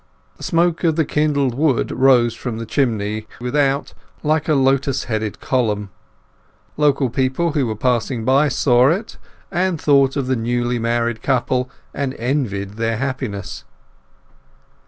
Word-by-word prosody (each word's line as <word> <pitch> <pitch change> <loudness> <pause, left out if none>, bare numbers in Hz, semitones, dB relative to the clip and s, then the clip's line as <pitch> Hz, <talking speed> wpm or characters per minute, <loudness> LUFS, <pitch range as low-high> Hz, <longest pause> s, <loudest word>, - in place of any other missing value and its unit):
The - - -18
smoke 170 0 +1
of 165 -2 +2
the 160 -1 +1
kindled 145 -4 +1
wood 140 -1 +1
rose 125 -3 +4
from 120 -3 -5
the 115 - -5
chimney 110 -4 -1
without 135 +3 0 0.3
like 155 0 +1
a 155 - +4
lotus 135 0 +1
headed 110 -3 -3
column; 105 -6 -1 0.8
local 145 -2 +2
people 135 +6 0
who 145 -4 0
were 110 - -3
passing 120 0 -1
by 135 +4 +4
saw 125 -2 +3
it, 195 +8 -2 0.3
and 180 -2 0
thought 140 -2 +3
of 140 -3 -1
the 130 0 0
newly 120 +1 -1
married 115 0 -1
couple, 125 -1 0 0.2
and 140 -1 -3
envied 110 -6 -2
their 115 0 -1
happiness. 130 -7 -4
130 Hz, 140 wpm, -20 LUFS, 115-145 Hz, 0.8 s, rose